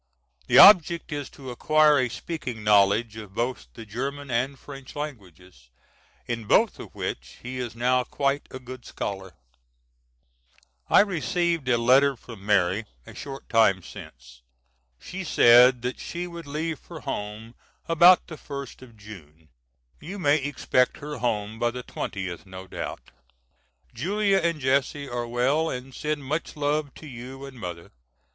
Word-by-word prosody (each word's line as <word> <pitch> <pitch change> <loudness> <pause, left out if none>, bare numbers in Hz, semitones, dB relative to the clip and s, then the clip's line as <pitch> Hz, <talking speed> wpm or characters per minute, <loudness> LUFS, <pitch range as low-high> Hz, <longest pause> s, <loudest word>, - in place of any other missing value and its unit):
The - - +4
object 170 -4 +7
is 145 -2 -4
to 130 -2 -9
acquire 150 +3 +4
a 125 -1 +1
speaking 125 -6 -6
knowledge 105 +2 +3
of 105 -3 -10
both 120 - -2
the 115 - -9
German 135 +5 -5
and 130 +4 -1
French 135 -1 -11
languages, 95 - -9 0.6
in 115 -2 -4
both - - +3
of - - -11
which - - -5
he 130 +1 -5
is 120 -2 -5
now 125 +2 +2
quite 140 +3 -1
a - - -7
good 130 -1 -10
scholar. 95 -3 -6 1.5
I - - +7
received 170 -5 -1
a 120 - +4
letter 135 +4 +4
from 115 -4 -12
Mary 100 0 +2 0.2
a - - -12
short 135 -1 -8
time 105 -6 +3
since. 65 -4 -12 0.6
She 190 +1 -7
said 125 -5 +6
that 125 +1 -3
she 175 +1 -5
would 170 -3 -9
leave 155 +1 -3
for 165 -4 -11
home 105 +1 -6 0.3
about 175 +2 +6
the 160 - -9
first 140 -4 -8
of 120 -4 -15
June. 80 -7 -14 0.5
You 180 +7 -8
may 150 -5 +3
expect 140 -3 0
her 150 0 -7
home 110 -2 -2
by 120 - +2
the 125 +1 -7
twentieth 95 -4 -5
no 95 0 -9
doubt. 95 - -7 0.8
Julia 195 - +1
and 170 -3 -1
Jesse 140 +1 0
are 120 -1 -4
well 135 +7 +1
and 125 +1 -6
send 150 -1 -3
much 155 +5 -3
love 145 0 0
to - - -12
you 130 0 -9
and 135 -3 -11
Mother. 85 -4 -7
125 Hz, 150 wpm, -25 LUFS, 110-145 Hz, 1.5 s, object